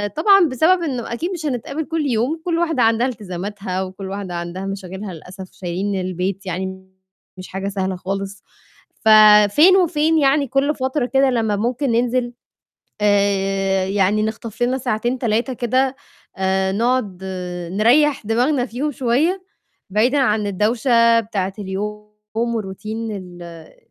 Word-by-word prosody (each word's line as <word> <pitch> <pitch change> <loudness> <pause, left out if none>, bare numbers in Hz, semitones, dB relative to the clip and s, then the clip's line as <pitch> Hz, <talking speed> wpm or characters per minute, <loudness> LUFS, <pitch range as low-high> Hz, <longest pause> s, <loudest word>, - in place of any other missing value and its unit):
طبعًا 390 +3 +5
بسبب 340 +8 +3
إنه 250 -7 -3
أكيد 335 +10 -3
مش 340 -4 -5
هنتقابل 275 +3 -3
كلّ 320 -1 -2
يوم، 255 +7 0
كلّ 335 -2 0
واحدة 320 -7 +1
عندها 225 +2 +3
التزاماتها 195 -3 -4
وكلّ 190 +1 -7
واحدة 195 -2 -5
عندها 175 +2 -5
مشاغلها 195 0 -6
للأسف 185 +3 -11
شايلين 190 +2 -3
البيت 185 +2 -3
يعني 190 +1 -5 0.5
مش 185 - -8
حاجة 195 +1 -4
سهلة 190 -1 -2
خالص، 195 +2 -5 0.6
ففين 215 - +7
وفين 320 -3 +2
يعني 280 -1 +3
كلّ 275 +4 +1
فترة 260 +1 -1
كده 270 +1 +2
لمّا 225 -4 0
ممكن 245 +5 -1
ننزل 240 +1 0 0.7
آآ، 195 -2 +1
يعني 200 +2 +1
نخطف 220 +1 -4
لنا 255 +2 +1
ساعتين، 240 +1 -1
3 235 +2 0
كده، 255 +2 0 0.4
آآ 190 0 0
نقعد 215 -4 -1 0.5
نريّح 245 +5 +3
دماغنا 245 +4 +1
فيهم 270 +5 -3
شوية، 290 +9 0 0.5
بعيدًا 235 +8 +2
عن 215 -6 +1
الدوشة 230 +3 +3
بتاعة 200 -4 -3
اليوم 210 +2 -5 0.3
والRoutine 225 -1 -3
ال 180 -3 -8
ال 165 -2 -12
220 Hz, 135 wpm, -20 LUFS, 195-260 Hz, 0.7 s, ففين